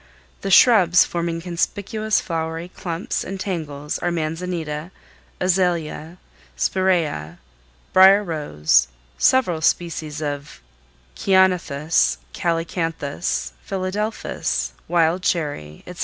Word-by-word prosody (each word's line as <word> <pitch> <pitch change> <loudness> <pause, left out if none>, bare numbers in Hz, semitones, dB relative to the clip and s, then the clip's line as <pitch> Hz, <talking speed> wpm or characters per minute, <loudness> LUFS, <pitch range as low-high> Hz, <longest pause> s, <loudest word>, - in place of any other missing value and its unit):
The 195 - -3
shrubs 190 -5 +6
forming 170 -1 -3
conspicuous 205 +5 -1
flowery 165 +1 -4
clumps 170 -1 -4
and 195 0 -6
tangles 150 -7 -4
are 175 - -1
manzanita, 165 -1 -3 0.5
azalea, 175 -3 0 0.4
spiræa, 165 - 0 0.6
brier 195 +2 +7
rose, 145 - +1 0.3
several 185 -12 +3
species 160 -2 -1
of 145 -1 -5 0.6
ceanothus, 170 - +2 0.2
calycanthus, 165 -2 -2
philadelphus, 185 - -2
wild 170 +1 +2
cherry, 145 - -2
etc. 180 0 -10
170 Hz, 85 wpm, -22 LUFS, 155-185 Hz, 0.6 s, brier